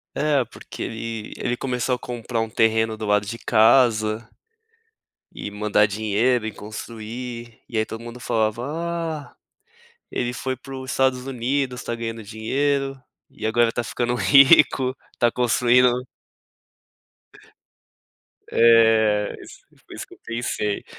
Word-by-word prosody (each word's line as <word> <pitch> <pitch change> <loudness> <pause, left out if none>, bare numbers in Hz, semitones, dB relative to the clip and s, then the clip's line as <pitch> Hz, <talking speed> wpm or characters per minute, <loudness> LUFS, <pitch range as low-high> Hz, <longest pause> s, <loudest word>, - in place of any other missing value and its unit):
É 140 -3 +2
porque - - -10
ele 115 -1 -5
ele 120 0 -2
começou 125 -1 -1
a - - -5
comprar 120 -1 -4
um 115 - -2
terreno 110 0 +2
do 110 -1 -5
lado 105 0 +2
de 115 +3 -6
casa 110 -1 +3 1.1
e - - -6
mandar 105 0 +2
dinheiro 110 +3 +1
e 110 - -3
construir, 115 +2 -8
e - - -9
aí - - +2
todo 115 +1 -8
mundo 120 +1 -9
falava: 115 0 -1
"Ah, 165 -2 -4 0.8
ele 120 0 -1
foi 130 +1 -3
para 135 +2 -10
o 130 0 -7
Estados 130 -1 0
Unidos, 130 0 -2
tá 120 - -3
ganhando 115 -1 -5
dinheiro 135 +5 -1 0.3
e - - -4
agora 115 +1 +3
tá 120 - -2
ficando 120 +1 -2
rico, 135 -1 +5 0.2
tá 120 -1 +3
construindo 125 +1 +3 2.4
Eh 110 -2 +4
is - - -13 0.3
foi - - -11
isso - - -7
que - - -15
eu - - -24
pensei, 115 -3 -2
120 Hz, 135 wpm, -23 LUFS, 110-130 Hz, 2.4 s, rico